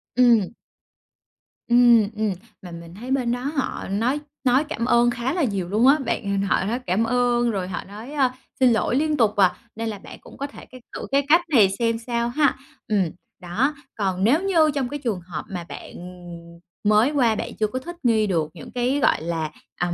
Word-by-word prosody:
Ừm. 235 Hz, -6 st, +4 dB, 1.2 s
Ừm, 240 Hz, -3 st, +5 dB
ừm, 215 Hz, -1 st, 0 dB, 0.3 s
mà 180 Hz, -, -10 dB
mình 170 Hz, 0 st, -10 dB
thấy 245 Hz, +6 st, -7 dB
bên 255 Hz, -3 st, +1 dB
đó 245 Hz, -, -1 dB, 0.2 s
họ 275 Hz, -, -2 dB
nói 235 Hz, +8 st, 0 dB, 0.2 s
nói 260 Hz, +2 st, +3 dB
cảm 295 Hz, -6 st, -3 dB
ơn 240 Hz, -1 st, +4 dB
khá 240 Hz, +3 st, -2 dB
là 350 Hz, -2 st, 0 dB
nhiều 195 Hz, -8 st, -2 dB
luôn 220 Hz, +6 st, +3 dB
á. 280 Hz, +3 st, +6 dB
Bạn 200 Hz, -4 st, -1 dB
h -, -, -1 dB
họ -, -, +2 dB
nói 230 Hz, +5 st, -1 dB
cảm 220 Hz, -3 st, 0 dB
ơn 240 Hz, 0 st, +2 dB
rồi 190 Hz, -4 st, -3 dB
họ 185 Hz, -, -5 dB
nói, 215 Hz, +7 st, -10 dB
a, 260 Hz, -4 st, +1 dB, 0.2 s
xin 255 Hz, -2 st, +5 dB
lỗi 230 Hz, +2 st, +1 dB
liên 305 Hz, +2 st, +1 dB
tục 220 Hz, -4 st, +2 dB
à, 190 Hz, -3 st, +4 dB, 0.2 s
nên 225 Hz, +1 st, -3 dB
là 210 Hz, -2 st, -6 dB
bạn -, -, -11 dB
cũng -, -, -14 dB
có 280 Hz, -, -3 dB
thể 285 Hz, -, -13 dB
cái 255 Hz, -1 st, -14 dB
thử -, -, -5 dB
cái 280 Hz, 0 st, +2 dB
cách 335 Hz, +3 st, +6 dB
này 225 Hz, -10 st, +5 dB
xem 230 Hz, -1 st, +1 dB
sao 235 Hz, -1 st, 0 dB
ha, 285 Hz, +2 st, +2 dB, 0.3 s
ừm, 195 Hz, -5 st, +1 dB, 0.3 s
đó. 225 Hz, +12 st, 0 dB, 0.2 s
Còn 190 Hz, -3 st, -1 dB
nếu 265 Hz, -, +4 dB
như 330 Hz, -6 st, +3 dB
trong 265 Hz, -3 st, -1 dB
cái 290 Hz, -, -5 dB
trường 220 Hz, -7 st, -1 dB
hợp 170 Hz, -3 st, -7 dB
mà 180 Hz, -3 st, -5 dB
bạn, -, -, -9 dB
ừm, 175 Hz, -1 st, -11 dB, 0.2 s
mới 215 Hz, +5 st, +4 dB
qua, 245 Hz, -7 st, +2 dB
bạn -, -, -5 dB
chưa 215 Hz, -, +2 dB
có 255 Hz, +5 st, -4 dB
thích 345 Hz, +7 st, -8 dB
nghi 220 Hz, -3 st, +3 dB
được 165 Hz, -5 st, 0 dB
những 165 Hz, -, -11 dB
cái, 250 Hz, +3 st, 0 dB
gọi 265 Hz, -, +2 dB
là, 160 Hz, -2 st, -3 dB, 0.3 s
ờm, 175 Hz, -1 st, 0 dB
230 Hz, 215 wpm, -23 LUFS, 195-255 Hz, 1.2 s, á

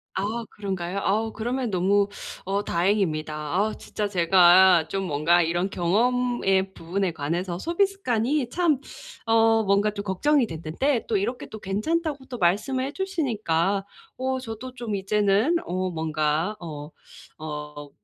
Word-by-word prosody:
아 220 Hz, +4 st, -2 dB
그런가요? 190 Hz, -2 st, -4 dB
어우 220 Hz, +3 st, 0 dB
그러면 240 Hz, +1 st, -2 dB
너무 200 Hz, +2 st, +2 dB, 0.4 s
어 200 Hz, +2 st, -1 dB
다행입니다. 170 Hz, -5 st, 0 dB, 0.2 s
아우 210 Hz, +3 st, +1 dB
진짜 210 Hz, -, -4 dB
제가 180 Hz, -2 st, +6 dB
좀 195 Hz, +3 st, -3 dB
뭔가 165 Hz, +2 st, +3 dB
이런 175 Hz, +3 st, 0 dB
경험의 195 Hz, 0 st, +1 dB
부분에 185 Hz, +2 st, -2 dB
관해서 170 Hz, +4 st, -3 dB
소비 340 Hz, -, +2 dB
습관이 260 Hz, -, -1 dB
참 325 Hz, -3 st, +1 dB, 0.5 s
어 225 Hz, 0 st, +4 dB
뭔가 200 Hz, +1 st, +2 dB
좀 200 Hz, -1 st, -5 dB
걱정이 250 Hz, +8 st, +2 dB
됐는데 165 Hz, -, -1 dB
또 220 Hz, -, +1 dB
이렇게 225 Hz, +6 st, -3 dB
또 220 Hz, -, -9 dB
괜찮다고 285 Hz, -, -2 dB
또 250 Hz, -2 st, -7 dB
말씀을 220 Hz, +9 st, +1 dB
해주시니까 215 Hz, -, -1 dB, 0.3 s
어 260 Hz, 0 st, -1 dB
저도 255 Hz, +1 st, -7 dB
좀 235 Hz, -4 st, -5 dB
이제는 205 Hz, -, +2 dB
어 185 Hz, +1 st, -2 dB
뭔가 160 Hz, +3 st, -1 dB
어 150 Hz, -2 st, -8 dB, 0.5 s
어 150 Hz, -1 st, -7 dB
200 Hz, 280 characters per minute, -25 LUFS, 175-240 Hz, 0.5 s, 제가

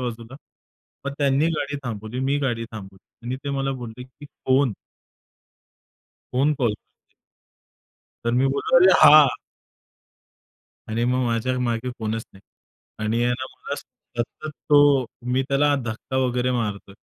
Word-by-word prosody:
बाजूला." 120 Hz, 0 st, -6 dB, 0.7 s
मग 140 Hz, -, -2 dB
त्यांनी 140 Hz, +2 st, +2 dB
गाडी 145 Hz, 0 st, -3 dB
थांबवली, 110 Hz, 0 st, -5 dB
मी 140 Hz, +2 st, +1 dB
गाडी 120 Hz, -4 st, -1 dB
थांबवली 95 Hz, +2 st, -12 dB
आणि 125 Hz, +2 st, -2 dB
ते 140 Hz, -, -2 dB
मला 135 Hz, 0 st, -1 dB
बोलले 120 Hz, 0 st, -8 dB
की 130 Hz, +3 st, -16 dB
"कोण?" 130 Hz, -2 st, +1 dB, 1.6 s
कोण 140 Hz, +4 st, +2 dB
कॉल 120 Hz, -5 st, +2 dB
करतंय? -, -, -29 dB, 1.1 s
तर 120 Hz, -, +1 dB
मी 135 Hz, -, +3 dB
बोललो, 140 Hz, +5 st, +1 dB
"अरे! 185 Hz, +1 st, +7 dB
हा!" 150 Hz, 0 st, +9 dB, 1.6 s
आणि 115 Hz, +2 st, -1 dB
मग 125 Hz, +1 st, +1 dB
माझ्या 120 Hz, +2 st, 0 dB
मागे 120 Hz, 0 st, -1 dB
कोणच 110 Hz, 0 st, -3 dB
नाही 95 Hz, -, -18 dB, 0.6 s
आणि 115 Hz, +2 st, +1 dB
आहे 125 Hz, -, +2 dB
ना 130 Hz, +1 st, -3 dB
मला 140 Hz, -, -5 dB
सतत 120 Hz, +1 st, -7 dB, 0.2 s
तो 145 Hz, -2 st, +6 dB, 0.3 s
मी 130 Hz, +1 st, +2 dB
त्याला 145 Hz, +1 st, +3 dB
धक्का 120 Hz, +3 st, -5 dB
वगैरे 125 Hz, -1 st, +1 dB
मारतोय. 105 Hz, -5 st, -3 dB
125 Hz, 135 wpm, -23 LUFS, 115-140 Hz, 1.6 s, हा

